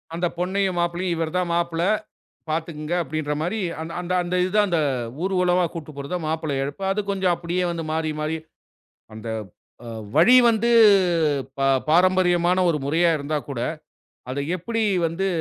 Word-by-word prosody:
அந்த 175 +1 0
பொண்ணையும் 190 +1 0
மாப்பிள்ளையும், 175 +1 -1
இவர் 165 +1 -3
தான் 180 -1 0
மாப்பிள்ளை. 170 +1 0 0.6
பார்த்துக்குங்க 155 0 -3
அப்படின்ற 155 -2 -3
மாரி, 180 +7 -2 0.4
அந்த 180 0 -5
அந்த 175 +1 -2
இது 185 - -2
தான், 210 -1 +4
அந்த 170 -2 +1 0.4
ஊர்வலமா 180 -1 +2
கூட்டு 160 -2 -7
போறத 140 +5 -4
மாப்பிள்ளை 155 -2 -2
அழைப்பு. 145 +7 -6
அது 205 +2 0
கொஞ்சம் 190 -2 +1
அப்டியே 175 +1 -2
வந்து 165 -1 -4
மாறி, 160 -1 -1
மாறி, 155 +1 -1 0.8
அந்த 110 +1 -8 0.6
அ - - -7 0.3
வழி 175 +11 +7
வந்து 230 0 +2 0.9
ப - - -4 0.3
பாரம்பரியமான 180 +1 +3
ஒரு 160 -3 +1
முறையா 165 +4 +2
இருந்தா 150 +1 -3
கூட, 135 -4 -4 0.7
அத 140 +2 -2
எப்படி 225 +6 -2 0.2
வந்து 165 +4 -2
170 Hz, 150 wpm, -23 LUFS, 155-185 Hz, 0.9 s, வழி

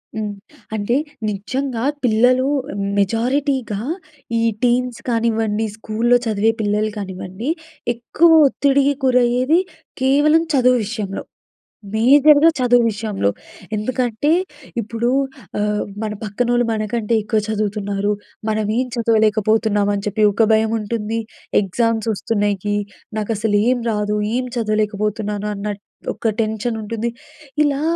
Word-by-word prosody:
హ్మ్. 210 -1 -3 0.4
అంటే 215 +3 0 0.3
నిజంగా 240 +4 -3 0.2
పిల్లలు 250 +3 +3 0.5
మెజారిటీగా 235 +1 0 0.6
ఈ - - +1 0.2
టీన్స్ 245 0 +1
కానివ్వండి, 225 -2 +1
స్కూల్‌లో 230 +3 +2
చదివే 220 0 +2
పిల్లలు 210 +1 +1
కానివ్వండి, 190 +5 -5 0.5
ఎక్కువ 320 +8 +3 0.2
ఒత్తిడికి 280 +1 +2
గురయ్యేది 250 +5 +3 0.4
కేవలం 295 +5 +4
చదువు 250 -1 +4
విషయంలో. 210 -3 -4 0.7
మేజర్‌గా 290 +6 +6
చదువు 245 -1 +4
విషయంలో. 205 - -1 0.5
ఎందుకంటే 245 +4 -1 0.5
ఇప్పుడు 230 +2 -2 0.5
ఆహ్, 210 0 0 0.2
మన 215 -1 -2
పక్కనోళ్ళు 240 +3 +1
మనకంటే 220 +1 -1
ఎక్కువ 215 0 0
చదువుతున్నారు. 205 -1 -1 0.4
మనం 215 0 0
ఏం 255 - +1
చదవలేకపోతున్నామని 215 -2 +2
చెప్పి 215 +1 0
ఒక 225 +3 +3
భయముంటుంది. 220 0 0 0.4
ఎగ్జామ్స్ 225 +3 0
వస్తున్నయికి, 205 -1 -1 0.4
నాకసలు 215 -1 0
ఏం 250 -1 +1
రాదు, 210 0 -1 0.2
ఏం 255 0 -1
చదవలేకపోతున్నాను 210 -1 -1
అన్న 200 +1 -6 0.5
ఒక 225 - 0
టెన్షన్ 220 +2 -1
ఉంటుంది. 230 +2 -3 0.5
ఇలా 285 0 0
220 Hz, 100 wpm, -20 LUFS, 210-245 Hz, 0.7 s, మేజర్‌గా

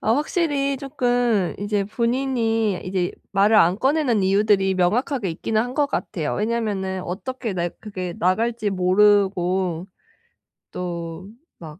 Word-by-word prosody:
아 220 - +2
확실히 290 -2 0
쪼끔 245 - 0
이제 205 0 -1
본인이 225 -2 0
이제 185 -1 -1 0.2
말을 205 +3 +4
안 175 -1 +5
꺼내는 265 -5 +2
이유들이 195 0 +3
명확하게 215 +5 0
있기는 215 +7 -1
한 245 +2 -3
것 290 -1 +2
같아요. 165 - -3
왜냐면은 205 -4 -2
어떻게 225 +6 -4
네 175 -2 -1
그게 185 -5 -5
나갈지 220 +4 0
모르고 185 -2 +2 0.9
또 170 0 -5 0.3
막 160 -1 -10
205 Hz, 270 characters per minute, -22 LUFS, 185-240 Hz, 0.9 s, 안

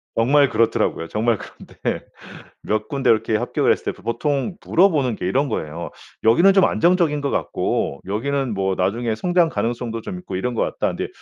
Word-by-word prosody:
정말 140 +4 +4
그렇더라고요. 110 -7 +1
정말 110 +2 0
그런데 - - -6 0.6
몇 110 0 -2
군데 135 -3 -1
이렇게 110 -1 +2
합격했을 - - 0
때 - - -18
보통 140 - -1
물어보는 150 - +3
게 90 - -4
이런 135 +7 +1
거예요. 85 -4 -4 0.3
"여기는 170 - +5
좀 195 -1 +5
안정적인 170 -4 +2
것 140 - -1
같고 70 - -1
여기는 130 +4 -1
뭐 95 -1 -1
나중에 110 +5 -1
성장 175 +4 +2
가능성도 115 -3 -3
좀 180 - -6
있고 95 - -7
이런 120 +6 -2
것 - - -1
같다. - - -1
근데 - - -4
120 Hz, 375 characters per minute, -21 LUFS, 110-145 Hz, 0.6 s, 여기는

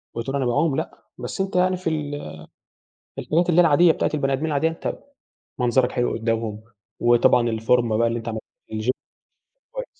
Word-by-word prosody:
وتقول 125 +4 -3
أنا 135 -2 0
باعوم، 135 +5 +1
لأ - - -5
بس - - -4
أنت 195 -1 -3
يعني 185 0 +3
في 175 -2 -2
ال 150 -2 -3 1.0
في - - -4
الحاجات 170 +3 +1
اللي 175 +1 +5
هي - - +5
العادية 165 +3 +5
بتاعة - - -1
البني 135 -2 0
آدمين 150 +4 -1
العادية 155 +1 +1
أنت 165 - -5 0.6
منظرك 125 +1 +2
حلو 120 -1 0
قدامهم، 115 -2 -2 0.4
وطبعًا 120 0 +4
الفورمة 115 0 +1
بقى 115 +1 +3
اللي 115 0 -1
أنت 115 - -10
عملت 110 -1 -4 0.3
الGym 110 +3 -2 0.8
كويس. - - -5
135 Hz, 180 wpm, -23 LUFS, 115-160 Hz, 1.0 s, اللي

